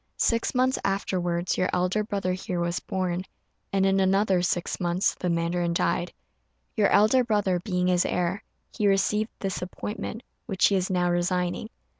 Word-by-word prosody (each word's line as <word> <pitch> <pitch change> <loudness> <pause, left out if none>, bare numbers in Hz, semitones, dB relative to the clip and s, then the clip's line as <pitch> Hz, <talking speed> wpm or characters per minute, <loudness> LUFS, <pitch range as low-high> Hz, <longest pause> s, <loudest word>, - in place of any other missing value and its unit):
Six 230 +2 +1
months 255 +1 +2
afterwards 180 -3 -1
your 185 - +2
elder 185 +4 +1
brother 200 -3 -2
here 180 -1 -3
was 170 0 -1
born, 185 -2 -2 0.5
and 195 -1 +2
in 195 0 +3
another 195 -1 +3
six 175 0 -1
months 175 +1 +1
the 180 - -3
mandarin 170 +1 0
died. 175 +1 0 0.6
Your 210 -3 +4
elder 215 +5 +4
brother 205 -6 +1
being 180 -1 -1
his 180 -1 +3
heir, 180 +2 -1 0.3
he 210 - 0
received 210 +3 +2
this 195 -2 -3
appointment, 210 +5 -5 0.2
which 195 -4 +3
he 200 - +2
is 185 -1 0
now 180 -1 +1
resigning. 175 0 -1
185 Hz, 160 wpm, -26 LUFS, 175-200 Hz, 0.6 s, Your